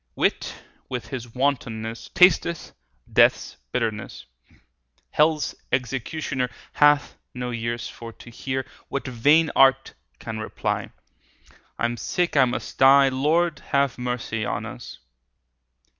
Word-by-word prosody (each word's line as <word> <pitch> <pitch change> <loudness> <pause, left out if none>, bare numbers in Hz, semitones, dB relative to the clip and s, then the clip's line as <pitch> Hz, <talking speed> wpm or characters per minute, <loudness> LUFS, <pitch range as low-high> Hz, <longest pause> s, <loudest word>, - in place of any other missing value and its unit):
Wit - - 0 0.3
with 125 -2 -5
his 120 -4 -7
wantonness 115 -4 -2
Tasteth 180 -2 +4 0.4
death's - - +3
bitterness; 110 -4 -3 0.2
30 - - -28 0.5
Hell's 155 0 +2 0.2
executioner 130 +1 -2 0.2
Hath 145 0 +3 0.2
no 125 0 -4
ears 120 0 -3
for 115 -1 -9
to 120 - -14
hear 130 +2 -3 0.2
What 140 -3 -4
vain 145 +6 +3
art 135 0 +4 0.2
can 110 - -6
reply; 110 - -3 0.9
I - - 0
am 120 0 -1
sick, 175 +8 -1
I 135 -2 +6
must 125 - -5
die— 135 +1 +7
Lord, 150 +5 +1
have 140 -3 0
mercy 125 -3 -3
on - - -3
us! - - -9
130 Hz, 120 wpm, -24 LUFS, 120-145 Hz, 0.9 s, die